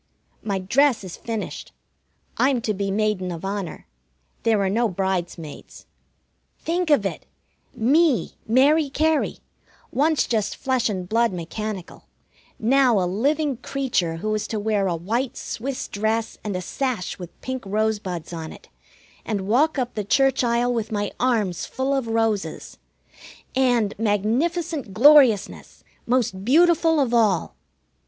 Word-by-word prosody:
My 200 -3 -2
dress 245 +6 +2
is 185 -3 -7
finished. 225 -2 -6 0.6
I'm 265 -1 +2
to 215 - -1
be 200 0 -2
Maiden 200 -2 0
of 170 +2 -6
Honor. 195 -2 -4 0.6
There 225 -2 +2
are - - +1
no 225 +4 +1
bridesmaids. 175 -4 -4 0.7
Think 345 +1 -2
of 285 -9 +4
it! 195 - -4 0.5
Me, 280 +3 +2
Mary 280 +6 +4
Cary, 310 +2 +1 0.5
once 305 +3 +2
just 215 -3 -1
flesh 260 -2 0
and 185 -3 -4
blood 230 +2 +2
mechanical, 185 +2 -6 0.5
now 250 0 +3
a 180 - +1
living 275 - 0
creature 245 -11 -1
who 215 +6 -2
is 215 - -2
to 220 - -3
wear 205 -2 0
a 175 - 0
white 230 +10 -2
Swiss 260 +3 -4
dress 220 +2 -1
and 205 -3 -3
a 180 - -2
sash 250 -5 -3
with 175 -2 -10
pink 260 -1 -4
rosebuds 205 -5 -2
on 160 -1 -6
it, - - -14 0.5
and 200 -3 -3
walk 290 +8 +2
up 250 -2 -2
the 210 - -3
church 270 +6 +2
aisle 240 +1 +1
with 225 -1 -3
my 205 -1 -1
arms 220 -8 0
full 265 +2 -1
of 270 -4 -1
roses. 225 -3 -2 0.8
And 245 -6 +2
magnificent 240 - -1
gloriousness! 265 -5 +4 0.2
most 235 -6 0
beautiful 325 - +4
of 255 -4 +1
all! 215 -7 +2
225 Hz, 140 wpm, -23 LUFS, 200-265 Hz, 0.8 s, of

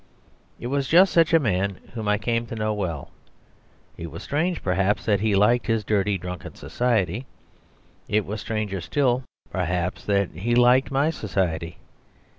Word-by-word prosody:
It - - -8
was 135 +1 -1
just 180 +6 +5
such 165 -1 +4
a 165 - +7
man 100 - 0 0.2
whom 110 -3 -4
I 105 0 +3
came 115 +2 -1
to 115 - -6
know 110 -1 -1
well. 85 -8 -4 0.9
It 85 - -6
was 80 +2 -9
strange, 165 +4 -1
perhaps, 95 +2 +1
that 100 -2 +2
he 105 0 +1
liked 120 +6 +3
his 115 -2 +1
dirty, 100 -1 +1
drunken 90 -1 -7
society; 120 -1 -1 0.8
it 105 0 +1
was 105 +1 -5
stranger 105 -4 -3
still, 130 - +1 0.3
perhaps, 90 0 -2
that 100 -2 +1
he 110 +9 -1
liked 125 +2 +5
my 140 +3 +2
society. 85 - -2
105 Hz, 160 wpm, -24 LUFS, 95-125 Hz, 0.9 s, a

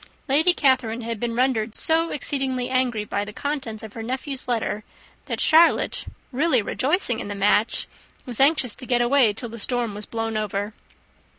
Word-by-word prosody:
Lady 305 +6 +4
Catherine 255 -7 +1
had 230 -1 -4
been 235 0 -2
rendered 235 -3 +1
so 325 +1 +3
exceedingly 265 -3 -2
angry 250 -5 0
by 205 - -2
the 205 - -7
contents 255 -4 -4
of 220 - -9
her 225 - -7
nephew's 260 +3 -3
letter, 225 -3 -2 0.4
that - - -4
Charlotte, 330 +1 +4 0.3
really 285 0 +2
rejoicing 255 - 0
in - - -6
the 205 - -5
match, 205 +2 +1 0.4
was 245 -4 -3
anxious 275 -4 +4
to 255 - -10
get 240 -1 +2
away 245 -2 +4
till 225 +4 -6
the 230 +1 -8
storm 240 -1 -1
was 210 +1 -4
blown 225 -1 -3
over. 205 0 -3
240 Hz, 175 wpm, -23 LUFS, 220-270 Hz, 0.4 s, Lady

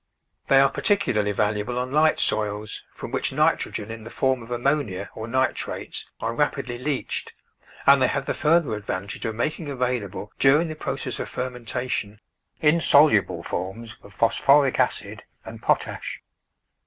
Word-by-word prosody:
They 135 - +6
are 135 0 +5
particularly 110 - +1
valuable 105 +3 -1
on 125 +1 -2
light 155 +2 +3
soils, 105 0 -1
from - - -8
which - - -1
nitrogen 105 +2 0
in 115 -1 -8
the 115 - -9
form 130 0 0
of 115 - -11
ammonia 120 -6 -1
or 110 0 -6
nitrates 130 +2 -2
are 115 +1 -2
rapidly 130 -2 -1
leached, 140 +1 -3 0.5
and 140 -1 +7
they 130 - +5
have 140 -1 -2
the - - -1
further 155 -6 +2
ad 105 - -7
vantage 100 0 -4
of 110 -1 -2
making 155 +6 -2
available 125 -7 -3
during 150 +5 +4
the 155 - -5
process - - -4
of - - -4
fermentation 125 -3 -3 0.4
insoluble 145 - +4
forms 110 +7 -5
of 100 - -15
phosphoric 135 +6 +3
acid - - -1 0.2
and - - -9
potash. - - -1
125 Hz, 150 wpm, -24 LUFS, 105-140 Hz, 0.5 s, and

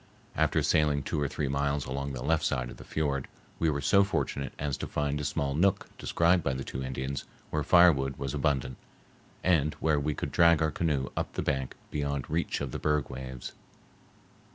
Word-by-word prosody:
After - - +2
sailing 75 -2 +2
two 75 - -2
or 70 - +1
three 70 +1 -2
miles 70 +1 0
along 70 +2 -3
the - - -5
left 80 0 +2
side 65 -5 -1
of - - -11
the - - -10
fiord, 70 -3 -1 0.3
we 80 - +3
were 70 -2 -1
so 100 +8 +5
fortunate 70 -7 -2
as 70 -2 -1
to - - -4
find 75 0 -1
a - - -4
small 70 -1 -1
nook 90 +6 +1
described 85 0 +2
by 70 - 0
the 65 - -4
two 65 - -5
Indians, 65 +1 -4 0.3
where - - 0
firewood 70 -7 +5
was 70 0 -3
abundant, 70 -4 0 0.7
and 75 -5 +2
where 80 -2 +1
we 75 +1 -1
could - - -4
drag 85 -2 +5
our 80 -1 +1
canoe 75 -7 0
up - - -2
the - - -2
bank 65 -3 -1 0.2
beyond 70 -2 -2
reach 85 -1 -1
of 70 -3 -3
the - - -4
berg 75 -2 0
waves. 65 -1 -6
70 Hz, 200 wpm, -29 LUFS, 65-80 Hz, 0.7 s, so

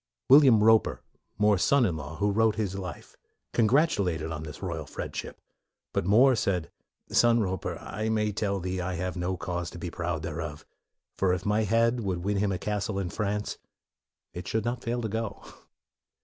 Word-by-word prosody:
William 130 -6 +7
Roper, 110 0 +4 0.3
More's 105 -2 +3
son 140 -3 +4
in 90 -6 0
law, 75 +1 -6
who 100 +5 +1
wrote 110 +1 +3
his 105 -4 -2
life, 95 -2 -7 0.4
congratulated 110 - +2
him 80 - -5
on 75 -2 -4
this 75 +3 -9
royal 85 -5 -4
friendship. - - -6 0.5
But 85 - -1
More 125 +6 +6
said, 90 -6 -1 0.2
" - - -46
Son 120 0 +4
Roper, 95 -4 -2
I 110 +3 -4
may 105 -1 +1
tell 100 -1 -1
thee 90 0 -3
I 90 +1 -3
have 90 +2 -3
no 90 +1 -2
cause 85 -1 -3
to - - -10
be 85 0 -5
proud 85 -3 -3
thereof; - - -5 0.5
for 95 -2 +3
if 90 -1 -3
my 105 +1 +2
head 115 +3 +2
would 95 -5 -2
win 100 +1 0
him 100 0 +1
a 95 - -1
castle 105 +1 -2
in 95 -3 -2
France, 105 -1 -2 0.7
it 90 0 -7
should 110 0 -1
not 120 +1 -2
fail 120 +1 -2
to - - 0
go." 110 0 -4
100 Hz, 190 wpm, -28 LUFS, 90-110 Hz, 0.7 s, William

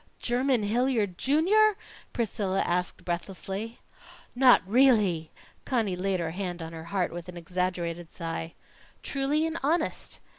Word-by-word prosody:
"Jermyn 250 -1 +1
Hilliard, 220 -3 +1
Junior?" 390 +9 +4 0.3
Priscilla 200 -4 -1
asked 180 +1 -2
breathlessly. 195 +5 -4 0.5
"Not 250 0 +6
really?" 205 - +3 0.3
Conny 225 -8 0
laid 190 +1 -1
her 165 -1 -2
hand 180 -1 -4
on 165 0 -7
her 160 0 -8
heart 185 -2 -1
with 175 +1 -7
an 180 - -8
exaggerated 175 -1 -3
sigh. 165 -1 -5 0.5
"Truly 285 +3 0
and 325 +1 -3
honest!" 315 +4 -1
195 Hz, 125 wpm, -28 LUFS, 175-260 Hz, 0.5 s, Not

